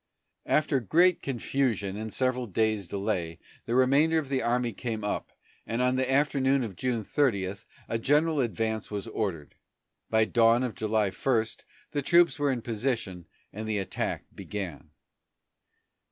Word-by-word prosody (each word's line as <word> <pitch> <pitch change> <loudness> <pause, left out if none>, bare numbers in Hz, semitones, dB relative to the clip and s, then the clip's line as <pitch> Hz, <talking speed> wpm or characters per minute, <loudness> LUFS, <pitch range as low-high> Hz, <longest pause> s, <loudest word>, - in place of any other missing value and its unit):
After 150 -2 +2
great 170 - +3
confusion 120 -6 -1
and 110 +1 -5
several 125 0 0
days' 110 -1 0
delay, 95 -4 -2 0.3
the 120 - 0
remainder 140 +6 +4
of 150 -4 -2
the 135 -2 0
army 120 0 0
came 110 0 -4
up, 105 - -3 0.4
and 115 - -2
on 125 0 +2
the 130 0 0
afternoon 135 -1 +2
of 105 -5 -6
June 120 +1 -1
30 100 -7 0 0.3
a 115 - -1
general 150 +5 +2
advance 110 -3 -1
was 105 -1 -4
ordered. 95 -10 -3 0.6
By 110 0 +4
dawn 115 +2 +4
of 125 -3 -2
July 110 -2 0
1 115 -2 +1 0.5
the 145 - -1
troops 170 +3 +4
were 145 -1 +2
in 120 -3 -3
position 110 -7 -3 0.3
and 110 +2 -5
the 110 -1 0
attack 95 -2 -3
began. 95 -8 -6
115 Hz, 150 wpm, -28 LUFS, 105-135 Hz, 0.6 s, remainder